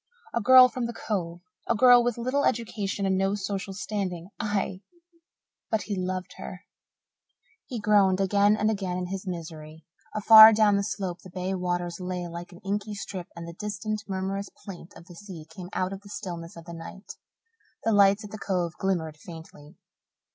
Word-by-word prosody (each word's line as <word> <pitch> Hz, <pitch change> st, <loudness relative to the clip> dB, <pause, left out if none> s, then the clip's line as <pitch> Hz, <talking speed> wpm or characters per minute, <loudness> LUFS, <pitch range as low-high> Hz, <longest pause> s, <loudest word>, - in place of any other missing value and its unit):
A 235 Hz, -, 0 dB
girl 255 Hz, +3 st, +8 dB
from 250 Hz, -1 st, -3 dB
the 235 Hz, -, -6 dB
Cove 175 Hz, -7 st, -3 dB, 0.3 s
a 235 Hz, -, +3 dB
girl 245 Hz, +1 st, +7 dB
with 240 Hz, -1 st, -1 dB
little 255 Hz, +4 st, 0 dB
education 210 Hz, -4 st, -1 dB
and 190 Hz, -1 st, +1 dB
no 195 Hz, +1 st, +1 dB
social 195 Hz, -1 st, -4 dB
standing 190 Hz, -4 st, -4 dB
aye! 200 Hz, -3 st, -2 dB, 0.9 s
but 220 Hz, -2 st, 0 dB
he 205 Hz, -, -3 dB
loved 185 Hz, 0 st, -3 dB
her. 185 Hz, +1 st, -8 dB, 1.0 s
He 245 Hz, -4 st, -5 dB
groaned 200 Hz, -3 st, +3 dB
again 200 Hz, +2 st, +3 dB
and 215 Hz, +1 st, +2 dB
again 190 Hz, -4 st, -3 dB
in 180 Hz, -, -3 dB
his 195 Hz, +1 st, -5 dB
misery. 160 Hz, -3 st, -7 dB, 0.3 s
Afar 220 Hz, +1 st, +10 dB
down 210 Hz, -1 st, +4 dB
the 200 Hz, -, +2 dB
slope 190 Hz, -3 st, -4 dB
the 185 Hz, -, -12 dB
bay 185 Hz, +1 st, -3 dB
waters 175 Hz, -1 st, -2 dB
lay 180 Hz, -1 st, -4 dB
like 170 Hz, +1 st, -8 dB
an 175 Hz, -, -14 dB
inky 205 Hz, +1 st, -2 dB
strip 190 Hz, -3 st, -6 dB
and 170 Hz, 0 st, -8 dB
the 170 Hz, -, -8 dB
distant, 210 Hz, +2 st, -4 dB
murmurous 195 Hz, +1 st, -3 dB, 0.2 s
plaint 185 Hz, -4 st, -9 dB
of 170 Hz, -, -13 dB
the 175 Hz, -, -13 dB
sea 175 Hz, -3 st, -10 dB
came 180 Hz, 0 st, -10 dB
out 185 Hz, +1 st, -2 dB
of 195 Hz, -, -8 dB
the 200 Hz, -, -15 dB
stillness 170 Hz, -4 st, -7 dB
of 165 Hz, -, -11 dB
the 170 Hz, -, -9 dB
night; 170 Hz, +4 st, -9 dB, 0.7 s
the 225 Hz, -, +2 dB
lights 200 Hz, +1 st, +5 dB
at 210 Hz, -, -10 dB
the 215 Hz, -, -7 dB
Cove 180 Hz, -4 st, -1 dB
glimmered 170 Hz, -6 st, -1 dB
faintly. 160 Hz, -1 st, -12 dB
195 Hz, 185 wpm, -27 LUFS, 180-210 Hz, 1.0 s, Afar